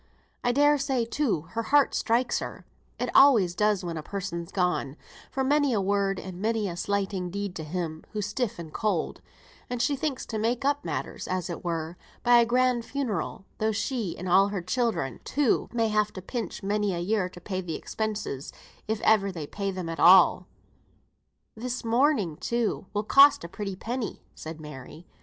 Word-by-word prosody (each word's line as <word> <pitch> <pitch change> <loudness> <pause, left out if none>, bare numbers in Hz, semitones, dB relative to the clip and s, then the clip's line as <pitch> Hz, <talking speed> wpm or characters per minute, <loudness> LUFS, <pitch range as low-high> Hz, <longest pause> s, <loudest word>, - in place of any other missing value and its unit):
I 245 - +3
dare 290 +3 +4
say, 265 -4 0
too, 230 - 0
her 230 - -1
heart 285 +4 +3
strikes 240 +2 +1
her - - -7 0.3
(it - - -3
always 230 -11 +6
does 210 0 +1
when 170 -1 -4
a - - -3
person's 170 -1 -5
gone) 180 -6 0 0.3
for 265 - -1
many 285 0 +3
a 215 - +2
word 195 0 +1
and 185 -1 -8
many 220 -1 0
a 175 - -4
slighting 195 -1 -1
deed 200 0 -4
to 160 - -5
him, 160 0 -4
who's 210 -2 -2
stiff 210 +2 -2
and 165 -3 -8
cold; 200 -7 -1 0.5
and 245 -1 -3
she 280 +4 +2
thinks 275 -1 -3
to 220 - -4
make 235 +4 0
up 285 +1 +1
matters, - - -4
as 185 -1 -2
it 170 - -6
were, 165 0 -3 0.3
by 240 0 +6
a 235 - +4
grand 250 0 +2
funeral, 230 -7 -3
though 220 0 +1
she 220 -3 -2
and 185 - -6
all 190 +3 +5
her 200 -3 -3
children, 200 - -1
too, 280 -4 +1
may 230 -2 +1
have 210 0 +1
to 185 - -7
pinch 235 0 -5
many 205 -1 0
a - - -3
year 185 +1 0
to 180 - -12
pay 185 0 -4
the 170 -3 -4
expenses, 210 -11 -4 0.4
if 220 0 -1
ever 200 -3 +3
they 165 -5 -5
pay 200 +6 -3
them 185 -3 -4
at 165 0 -5
all." 185 +1 +7 1.1
"This 245 +2 -5
mourning, 230 - +2
too, 235 -1 -1
will 210 0 -1
cost 275 +3 +6
a - - -5
pretty 195 +2 -5
penny," 235 +4 -4
said 160 0 -8
Mary. 150 +2 -10
205 Hz, 190 wpm, -27 LUFS, 180-240 Hz, 1.1 s, all